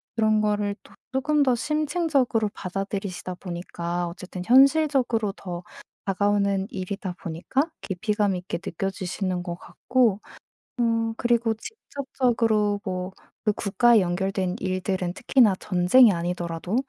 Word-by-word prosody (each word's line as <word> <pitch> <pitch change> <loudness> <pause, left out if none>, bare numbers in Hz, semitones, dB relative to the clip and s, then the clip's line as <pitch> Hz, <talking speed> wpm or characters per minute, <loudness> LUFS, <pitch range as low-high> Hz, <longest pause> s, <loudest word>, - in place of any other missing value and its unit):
그런 215 -1 +3
거를 210 -1 0
또 - - -19 0.2
쪼끔 285 +2 +2
더 255 -2 +3
심층적으로 295 -5 +1
받아들이시다 195 0 -4
보니까 175 -1 -4
어쨌든 180 +1 -7
현실적으로 265 -5 +4
더 175 -3 -6 0.4
다가오는 200 0 +1
일이다 190 -1 -5
보니까 195 - -1
깊이감 205 0 0
있게 180 -1 -4
느껴지시는 185 0 -3
것 175 -1 -4
같고 235 -6 +1 0.6
어 230 -1 +1
그리고 235 -1 +2
직접적으로 230 - -1
뭐 185 0 -3 0.3
그 210 - +3
국가에 225 +3 +4
연결된 185 +1 -1
일들은 185 -1 -2
특히나 235 -3 +3
전쟁이 205 +6 +5
아니더라도 175 +1 -3
205 Hz, 300 characters per minute, -25 LUFS, 185-235 Hz, 0.6 s, 전쟁이